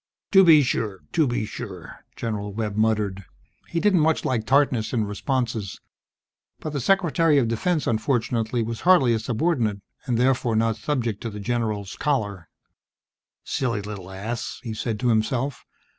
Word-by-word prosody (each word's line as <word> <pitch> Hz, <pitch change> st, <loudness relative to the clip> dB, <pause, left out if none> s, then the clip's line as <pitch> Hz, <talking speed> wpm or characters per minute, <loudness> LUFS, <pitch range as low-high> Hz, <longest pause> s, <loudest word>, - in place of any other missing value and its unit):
"To 195 Hz, -1 st, +8 dB
be 160 Hz, -4 st, +7 dB
sure. 105 Hz, -6 st, -2 dB
To 155 Hz, -3 st, +2 dB
be 120 Hz, -3 st, -1 dB
sure," 100 Hz, -6 st, -8 dB
General 105 Hz, -3 st, -3 dB
Webb 105 Hz, 0 st, -3 dB
muttered. 105 Hz, -3 st, 0 dB, 0.4 s
He 170 Hz, -, -2 dB
didn't 195 Hz, -1 st, +3 dB
much 160 Hz, +1 st, +2 dB
like 115 Hz, -4 st, -1 dB
tartness 135 Hz, -5 st, +2 dB
in 110 Hz, -3 st, +1 dB
responses, 115 Hz, -, -2 dB, 0.8 s
but 155 Hz, -, -5 dB
the 140 Hz, -, -2 dB
Secretary 165 Hz, -1 st, +3 dB
of 130 Hz, -4 st, +3 dB
Defense, 150 Hz, +8 st, 0 dB
unfortunately, 115 Hz, 0 st, 0 dB
was 115 Hz, 0 st, -5 dB
hardly 165 Hz, -10 st, +5 dB
a 110 Hz, -, +1 dB
subordinate, 115 Hz, -, 0 dB, 0.2 s
and 120 Hz, -3 st, +1 dB
therefore 125 Hz, -2 st, +2 dB
not 115 Hz, 0 st, +1 dB
subject 115 Hz, -3 st, -2 dB
to 115 Hz, -, -3 dB
the 105 Hz, -1 st, -7 dB
general's 105 Hz, -3 st, -2 dB
choler. 105 Hz, -11 st, -1 dB, 0.9 s
Silly 115 Hz, -6 st, -1 dB
little 100 Hz, -3 st, -7 dB
ass! 110 Hz, +5 st, -5 dB
he 115 Hz, -3 st, -4 dB
said 110 Hz, 0 st, -3 dB
to 125 Hz, -, +2 dB
himself. 120 Hz, +4 st, 0 dB
115 Hz, 155 wpm, -24 LUFS, 105-135 Hz, 0.9 s, To